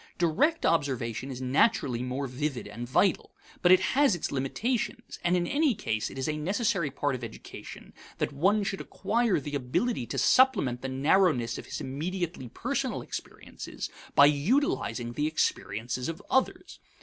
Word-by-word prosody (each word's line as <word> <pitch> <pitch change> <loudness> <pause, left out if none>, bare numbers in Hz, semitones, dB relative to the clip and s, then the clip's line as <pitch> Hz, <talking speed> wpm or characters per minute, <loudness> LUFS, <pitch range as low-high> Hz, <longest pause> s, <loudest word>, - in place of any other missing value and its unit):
Direct 230 - +2
observation 130 -5 0
is 130 -1 -6
naturally 130 - +2
more 130 +2 -3
vivid 135 -1 -3
and 115 +4 -7
vital. 185 +8 +1 0.3
But 180 - +5
it 185 0 +7
has 275 -7 +4
its 175 - -3
limitations; 225 - -2
and 175 +1 +3
in 175 - 0
any 285 - +2
case 110 - -2
it - - -10
is 130 - -2
a 150 0 -1
necessary 195 - 0
part 140 +1 -1
of 130 -1 -5
education 115 -1 -9 0.2
that - - -2
one 195 +9 +2
should 195 -1 -3
acquire 235 -4 0
the 145 +1 -7
ability 140 - -1
to 135 - -4
supplement 140 - +4
the 135 - -3
narrowness 135 -3 +2
of - - -10
his - - -5
immediately 160 0 -4
personal - - -2
experiences - - -7 0.2
by 140 - +9
utilizing 150 - +1
the 150 +4 0
experiences 125 -4 -1
of 165 - -5
others. 265 - 0
150 Hz, 160 wpm, -28 LUFS, 130-195 Hz, 0.3 s, by